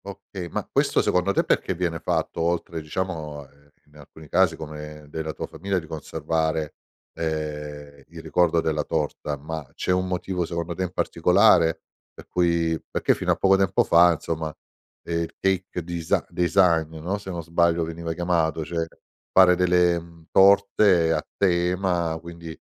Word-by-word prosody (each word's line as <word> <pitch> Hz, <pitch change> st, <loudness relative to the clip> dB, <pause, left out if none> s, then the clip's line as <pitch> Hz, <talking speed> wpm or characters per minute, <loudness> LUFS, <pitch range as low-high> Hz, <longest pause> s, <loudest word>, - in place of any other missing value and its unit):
Okay, 100 Hz, -2 st, -8 dB
ma -, -, -4 dB
questo -, -, +1 dB
secondo 90 Hz, +2 st, +1 dB
te -, -, +2 dB
perché 95 Hz, -, 0 dB
viene 85 Hz, -2 st, -2 dB
fatto 85 Hz, -, -2 dB
oltre, 85 Hz, -1 st, -1 dB
diciamo, 75 Hz, -3 st, -5 dB
ehm, 70 Hz, +1 st, -26 dB, 0.2 s
in 75 Hz, 0 st, -21 dB
alcuni 75 Hz, +2 st, -14 dB
casi 95 Hz, -4 st, +3 dB
come 75 Hz, -1 st, -9 dB
della 80 Hz, +1 st, -4 dB
tua 75 Hz, -, -5 dB
famiglia, 95 Hz, +4 st, -3 dB
di 85 Hz, -, -3 dB
conservare, 80 Hz, 0 st, -2 dB, 0.4 s
ehm, 75 Hz, -2 st, -5 dB
il -, -, -11 dB
ricordo 85 Hz, -2 st, +2 dB
della 80 Hz, -2 st, -1 dB
torta, 75 Hz, -2 st, -2 dB
ma 80 Hz, +2 st, -6 dB
c'è -, -, -1 dB
un 90 Hz, 0 st, +1 dB
motivo 90 Hz, 0 st, -2 dB
secondo 85 Hz, +1 st, -4 dB
te 85 Hz, -, -6 dB
in 90 Hz, -1 st, -2 dB
particolare 90 Hz, -1 st, +3 dB, 0.3 s
per -, -, -13 dB
cui 85 Hz, -2 st, +1 dB
perché -, -, +2 dB
fino -, -, -1 dB
a -, -, +3 dB
poco 95 Hz, 0 st, +4 dB
tempo 95 Hz, -1 st, +2 dB
fa, 85 Hz, +1 st, +6 dB
insomma, 80 Hz, 0 st, -4 dB, 0.5 s
ehm, 85 Hz, 0 st, -2 dB
il 85 Hz, -, -5 dB
cake 95 Hz, -2 st, -1 dB
desi 85 Hz, -1 st, -1 dB
design, 85 Hz, -2 st, +2 dB
no, 95 Hz, +6 st, -3 dB
se 95 Hz, -, -9 dB
non 85 Hz, -2 st, -4 dB
sbaglio 85 Hz, +1 st, +2 dB
veniva 80 Hz, 0 st, -4 dB
chiamato, 80 Hz, -2 st, 0 dB
cioè, 85 Hz, 0 st, -2 dB, 0.5 s
fare 95 Hz, -1 st, +7 dB
delle, 90 Hz, -1 st, +3 dB
mhmm, 85 Hz, -1 st, -16 dB
torte 95 Hz, -3 st, +5 dB
a 75 Hz, -, -1 dB
tema, 90 Hz, -2 st, +1 dB
quindi, 85 Hz, -1 st, -10 dB
85 Hz, 160 wpm, -24 LUFS, 80-90 Hz, 0.5 s, fare